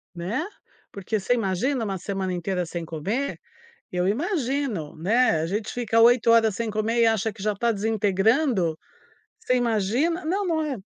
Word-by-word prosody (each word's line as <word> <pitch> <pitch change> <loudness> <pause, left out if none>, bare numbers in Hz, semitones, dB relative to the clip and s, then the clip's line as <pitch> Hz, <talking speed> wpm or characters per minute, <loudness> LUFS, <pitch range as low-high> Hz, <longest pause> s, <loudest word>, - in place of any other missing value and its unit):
Né, 185 - -2 0.5
porque 200 +2 -3
você 195 +5 +1
imagina 230 +4 0
uma 195 -2 -2
semana 190 0 -3
inteira 180 +1 -2
sem 170 +1 -5
comer? 195 - -3 0.5
Eu 180 0 0
imagino, 265 - -1
né, 185 +1 +2
a - - -1
gente 210 +4 -3
fica 230 -2 +1
8 235 0 +5
horas 225 -3 +4
sem 230 +1 -2
comer 215 +2 0
e - - +5
acha 220 -1 +1
que 205 - -12
já 210 -1 0
tá 235 +3 +1
desintegrando, 210 - +1 0.6
você 255 - 0
imagina? 245 - 0
Não, 390 +5 0
não 330 -3 0
é 290 -4 -3
220 Hz, 165 wpm, -24 LUFS, 190-245 Hz, 0.6 s, 8